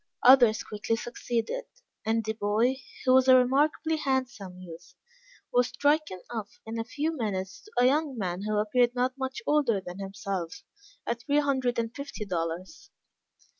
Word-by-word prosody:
Others 245 -4 +7
quickly 210 +2 -2
succeeded, 240 - -3 0.4
and 225 +1 +1
the 220 +1 -2
boy, 220 +5 +1 0.3
who 255 - +5
was 260 0 +5
a 260 - +9
remarkably 295 +5 +2
handsome 245 -10 -2
youth, 170 -3 -12 0.6
was 245 0 +4
stricken 290 - 0
off 220 -4 -6
in 225 +1 -4
a - - -1
few 300 +7 -2
minutes 195 -6 -3
to 430 - -16
a 245 - +5
young 285 0 +2
man 185 -3 -2
who 210 +1 -1
appeared 240 +4 +2
not 255 +1 0
much 265 -1 -4
older 280 -9 +2
than 180 0 -9
himself, 195 -3 -5 0.4
at 235 0 -2
three 285 +6 +1
hundred 265 -4 +1
and 230 0 -2
fifty 280 -6 -6
dollars. 175 - -4
235 Hz, 160 wpm, -28 LUFS, 205-265 Hz, 0.6 s, a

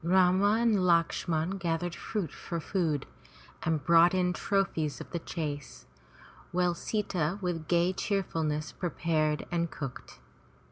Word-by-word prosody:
Rama 185 +3 +4
and 230 -3 +3
Lakshman 170 +1 +1
gathered 170 0 -1
fruit 195 -1 -3
for 170 -2 -5
food 160 -5 -1 0.6
and 160 -3 0
brought 170 +3 +6
in 180 -1 +2
trophies 175 -6 0
of - - -9
the 170 - -2
chase, 150 -4 -5 0.7
which 180 -1 +1
Sita 185 -5 -1
with 175 -5 -3
gay 175 +2 +3
cheerfulness 165 -6 -1
prepared 155 -3 0
and 170 -1 0
cooked. 135 -5 -7
170 Hz, 125 wpm, -30 LUFS, 160-185 Hz, 0.7 s, brought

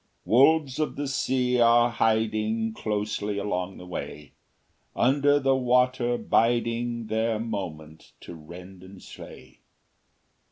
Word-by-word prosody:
Wolves 140 +3 +3
of 155 - -2
the 145 0 -4
sea 125 -2 0
are 120 0 +4
hiding 110 0 0
Closely 105 -1 -3
along 95 -2 -3
the 90 - -11
way, 75 -5 -8 0.6
Under 145 +3 +3
the 135 -1 +2
water 125 -1 +1
biding 115 0 0
Their 110 +1 -1
moment 85 -9 -7
to - - -10
rend 90 +4 -12
and 95 +1 -13
slay. - - -13
115 Hz, 115 wpm, -26 LUFS, 100-125 Hz, 0.6 s, are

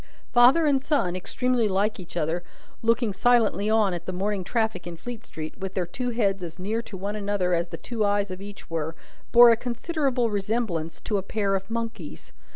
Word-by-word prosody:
Father 255 +7 +6
and 280 -3 +3
son, 275 - +1
extremely 245 +5 0
like 205 +2 0
each 175 -1 -8
other, 165 +2 -1 0.4
looking 230 -2 +2
silently 220 -2 +3
on 215 -4 +3
at 170 -1 -6
the - - -1
morning 195 +1 -1
traffic 220 -3 -1
in 170 -1 -7
Fleet 235 +5 -7
street, 155 0 -7
with 190 -1 -5
their 185 -2 0
two 245 +8 -3
heads 200 -5 0
as 170 -2 -7
near 210 +5 -2
to 215 -4 -9
one 200 +3 -3
another 200 -3 0
as 170 0 +1
the - - -7
two 230 -3 -3
eyes 205 -1 +1
of 185 +1 -7
each 205 -1 -10
were, 165 -1 -3 0.4
bore 240 0 +9
a - - +5
considerable 250 0 -1
resemblance 195 -6 -2
to 205 -2 0
a - - -3
pair 200 0 -1
of 195 +1 -2
monkeys. 225 -8 -5
205 Hz, 200 wpm, -26 LUFS, 185-235 Hz, 0.4 s, bore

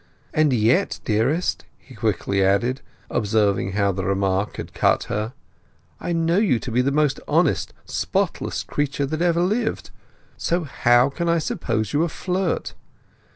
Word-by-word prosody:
And 155 -2 +3
yet, 115 0 +2
dearest," 125 +11 0
he 130 - -17
quickly 100 -3 0
added, 110 +8 +1 0.3
observing 100 -3 +1
how 100 -1 +2
the 95 0 -3
remark 95 +1 0
had - - -7
cut - - +2
her, 105 +4 -3 0.7
"I - - -4
know 165 +2 +2
you 200 - +3
to 120 - -6
be 120 +2 +3
the 135 +2 +1
most 150 -1 +1
honest, - - +2
spotless - - -1
creature 145 -1 -1
that 155 +4 -3
ever 170 -1 +2
lived. 220 +5 -1 0.5
So 175 +1 0
how 125 -2 +3
can 170 +4 -2
I 170 - +3
suppose 110 -8 -2
you 145 - +2
a 170 - +1
flirt? 185 +1 -2
130 Hz, 155 wpm, -23 LUFS, 105-165 Hz, 0.7 s, And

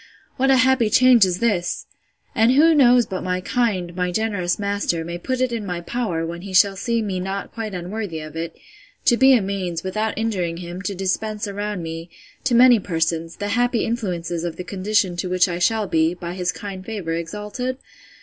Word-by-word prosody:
What 270 +1 +1
a 270 - +6
happy 255 -3 +3
change 250 -2 +6
is 180 -1 -1
this! 190 -7 0 0.5
And 225 +3 +4
who 320 +4 +6
knows 250 -5 +5
but 185 -2 -5
my 180 0 -1
kind, 185 -5 -1
my 180 -1 -1
generous 200 -3 -1
master, 200 -5 -1
may 170 +1 -5
put 255 +7 -2
it 255 -1 +1
in 230 -2 -3
my 180 -3 -3
power, 175 -3 -2
when 170 +1 -6
he 190 0 -6
shall 195 +1 +5
see 230 +3 -1
me 190 -3 -2
not 195 +2 -4
quite 220 -4 -5
unworthy 180 -1 -4
of 155 0 -9
it, 165 +1 -5 0.5
to 240 - +5
be 265 +2 +6
a 225 - +2
means, 185 -4 -3
without 215 +3 -2
injuring 185 -7 -1
him, 175 +1 -7
to 200 0 -3
dispense 210 +3 -2
around 205 -2 -4
me, 165 +1 -6 0.4
to 250 -2 +2
many 245 -1 +7
persons, 165 -2 -2
the 205 0 -4
happy 245 +1 +1
influences 175 -7 -3
of 170 -2 -3
the 180 - -6
condition 195 0 0
to 180 +1 -2
which 185 +1 +3
I 175 -1 -3
shall 220 +4 +2
be, 160 -1 +1
by 175 -1 -6
his 180 -1 -1
kind 190 +2 -7
favour, 195 -6 -4
exalted? 210 +9 -4
195 Hz, 200 wpm, -22 LUFS, 175-225 Hz, 0.5 s, many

